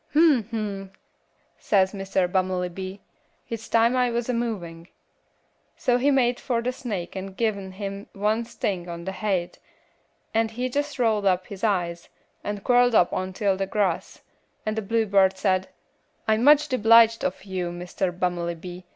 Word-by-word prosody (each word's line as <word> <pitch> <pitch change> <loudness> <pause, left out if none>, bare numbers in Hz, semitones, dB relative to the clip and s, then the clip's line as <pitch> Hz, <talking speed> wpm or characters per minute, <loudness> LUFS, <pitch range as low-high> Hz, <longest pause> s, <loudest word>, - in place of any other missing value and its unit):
"'Hm! 295 -7 +5
hm!' 205 -4 -4 0.7
says 190 -2 +2
Mr. 195 -2 0
Bummelybee, 185 +1 -2 0.4
'hit's 225 -1 -6
time 230 +2 +4
I 250 -1 +3
was 235 +1 -2
a - - +1
movin',' 180 -8 -4 0.9
so 245 0 +2
he 275 +3 +3
made 250 -3 +2
fur 240 -3 -1
the 250 - 0
snake 205 -9 -5
and 190 0 -6
giv' 225 -2 +2
him 195 +1 -7
one 210 +3 0
sting 200 -6 -3
on 170 0 -7
the 190 - -2
haid, 190 -4 -2 0.7
and 225 0 +2
he 245 +3 -3
jess 290 +2 -2
rolled 220 -5 +2
up 185 -1 +2
he 200 - -8
eyes, 175 -5 -1 0.3
and 205 -1 -4
quirled 245 -1 +4
up 180 - +5
ontil 190 +1 0
the 195 0 -2
grass; 195 -4 -1 0.4
and 215 0 -1
the 220 - -1
bluebird 200 -3 +2
said, 185 -1 +1 0.6
'I'm 220 +1 +2
much 295 +2 +6
debliged 230 -2 +5
of 185 - -2
you, 185 -3 -3
Mr. 180 +1 -3
Bummelybee. 175 0 -3
200 Hz, 155 wpm, -25 LUFS, 185-230 Hz, 0.9 s, much